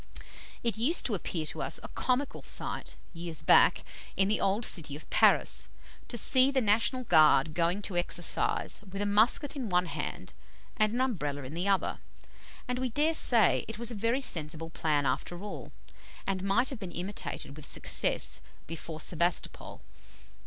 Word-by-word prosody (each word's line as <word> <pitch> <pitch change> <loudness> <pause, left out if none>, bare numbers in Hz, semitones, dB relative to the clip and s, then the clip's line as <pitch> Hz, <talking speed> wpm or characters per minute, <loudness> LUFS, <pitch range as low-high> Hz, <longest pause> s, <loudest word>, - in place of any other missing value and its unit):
It 230 -3 -1
used 295 +10 +3
to 235 - -1
appear 170 -4 -3
to - - -7
us - - -2
a - - -6
comical 260 +2 -2
sight, - - -3 0.2
years 165 -2 -5
back, - - +5 0.3
in 195 +1 +3
the 215 - 0
old 200 +4 +1
city 150 -4 0
of 150 - -10
Paris, - - +3 0.4
to 240 - -4
see 260 +3 +5
the 275 -1 +1
National 230 +3 +1
Guard 155 - +4
going 175 +5 0
to 190 - -4
exercise 175 +3 +2
with 195 - -6
a 205 - -1
musket 220 +8 +2
in 255 -6 -4
one 180 0 +2
hand 165 - -6 0.4
and 215 0 +2
an 245 +3 -1
Umbrella 150 - -2
in 130 +3 -8
the 175 +4 -2
other, 195 -1 0 0.7
and 250 0 -2
we 255 0 -1
dare 300 +7 +1
say 230 - +4
it 225 0 -6
was 235 +1 -1
a - - -5
very 230 +5 0
sensible 160 - -2
plan 150 -3 0
after 165 +8 -3
all, 210 - -8 0.5
and 190 -1 -2
might 195 +6 +1
have 265 - -6
been 190 -4 -6
imitated 175 -5 -5
with 155 - -11
success - - 0 0.2
before 165 -1 -7
Sebastopol. 170 +2 -1
195 Hz, 170 wpm, -29 LUFS, 165-235 Hz, 0.7 s, back